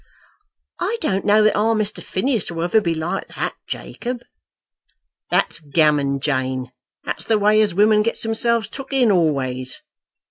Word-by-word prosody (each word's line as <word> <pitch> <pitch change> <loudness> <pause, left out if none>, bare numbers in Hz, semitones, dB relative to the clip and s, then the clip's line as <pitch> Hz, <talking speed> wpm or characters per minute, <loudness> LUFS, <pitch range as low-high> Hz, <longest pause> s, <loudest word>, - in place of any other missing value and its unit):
"I 465 - -1
don't 195 -10 -1
know 215 +1 +5
that 215 - +3
our 225 +2 +2
Mr. 215 -1 -1
Phineas 230 +2 -1
will 165 -1 -3
ever 195 +6 +3
be 170 -4 -1
like 160 +2 -3
that, - - -2
Jacob." 245 0 -5 1.1
"That's - - +1
gammon, 145 -2 +2
Jane. 130 -2 -2 0.3
That's - - -4
the 225 - +3
way 210 +1 +4
as 210 -5 +1
women 210 +2 +5
gets 230 +2 -1
themselves 225 0 0
took 275 0 -8
in 250 -5 +4
always. 135 -7 0
205 Hz, 150 wpm, -21 LUFS, 150-225 Hz, 1.1 s, know